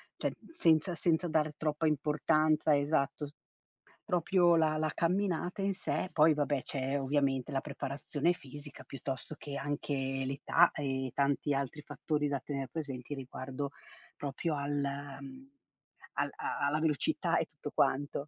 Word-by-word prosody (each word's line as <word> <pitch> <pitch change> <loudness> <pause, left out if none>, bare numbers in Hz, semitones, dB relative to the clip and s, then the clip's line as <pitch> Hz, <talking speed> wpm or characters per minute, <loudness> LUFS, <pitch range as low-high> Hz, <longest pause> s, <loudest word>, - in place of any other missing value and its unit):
cioè - - -1 0.2
senza 170 - +3
senza 170 +1 +2
dare 155 -1 +1
troppa 155 +1 0
importanza, 155 +1 +3
esatto, 145 0 +1
s 145 - -15 0.7
proprio 175 0 +4
la 155 -1 +3
la 155 0 +1
camminata 180 +1 0
in 195 - +2
sé. 185 - -1
Poi 155 0 +6
vabbè, 145 -2 +1
c'è 135 0 -1
ovviamente 135 -1 +1
la 135 - +1
preparazione 145 +3 -1
fisica 145 0 -10
piuttosto 135 +2 -5
che 140 -1 -6
anche 145 0 -2 0.3
l'età 145 +5 +4
e 130 -3 -2
tanti 140 +1 +2
altri 140 +2 -2
fattori 150 -1 -1
da 140 -2 -1
tener 135 -1 -4
presenti 145 -4 -4
riguardo 135 +1 -5 0.5
proprio 150 +3 -2
al, 140 +1 -2 0.5
mhmm, 270 0 -10 0.7
al - - 0
a - - -3
alla 150 +2 +1
velocità 155 -4 +1
e - - 0
tutto - - -8
quanto. 145 +1 +1
150 Hz, 140 wpm, -32 LUFS, 140-160 Hz, 0.7 s, Poi